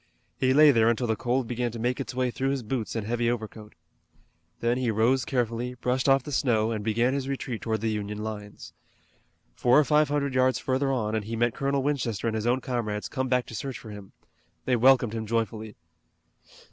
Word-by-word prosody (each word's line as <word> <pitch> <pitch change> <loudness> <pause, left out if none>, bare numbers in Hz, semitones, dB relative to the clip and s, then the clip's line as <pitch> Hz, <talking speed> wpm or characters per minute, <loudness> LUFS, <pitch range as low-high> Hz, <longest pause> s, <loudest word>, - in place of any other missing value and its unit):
He 130 - +3
lay 150 +2 +7
there 115 -3 +4
until 120 +1 0
the 110 -1 0
cold 125 +3 -1
began 120 0 -2
to - - -6
make 125 +3 -1
its 135 -2 -5
way 125 -1 0
through 135 +3 -1
his 135 -2 -2
boots 115 0 -3
and 110 -3 -2
heavy 120 +1 0
overcoat. 110 -2 -5 0.8
Then 120 +2 0
he 125 -2 0
rose 120 +4 +2
carefully, 120 -1 -2
brushed 125 +2 0
off 135 -1 +4
the 145 - -7
snow, 115 -5 +1
and 110 -2 -3
began 115 +4 +1
his 135 -1 -2
retreat 130 -4 -4
toward 110 -2 -2
the 110 -1 0
Union 105 -1 -4
lines. 105 -2 -7 0.8
Four 125 - +3
or 150 - +6
five 150 0 +3
hundred 140 -2 -1
yards 130 0 +3
further 135 +1 0
on 110 -5 -1
and 110 -2 -1
he 115 +2 -4
met 120 0 +1
Colonel 140 0 -1
Winchester 130 -8 -1
and 115 - 0
his 110 +1 -2
own 125 +2 +2
comrades 105 -7 -3
come 130 0 -2
back 125 -1 +1
to - - -11
search 130 +4 -4
for 110 - -10
him. 100 -2 -11 0.5
They 130 - +2
welcomed 125 -2 +4
him 110 -1 -4
joyfully. 110 -1 -2
120 Hz, 210 wpm, -27 LUFS, 110-130 Hz, 0.8 s, lay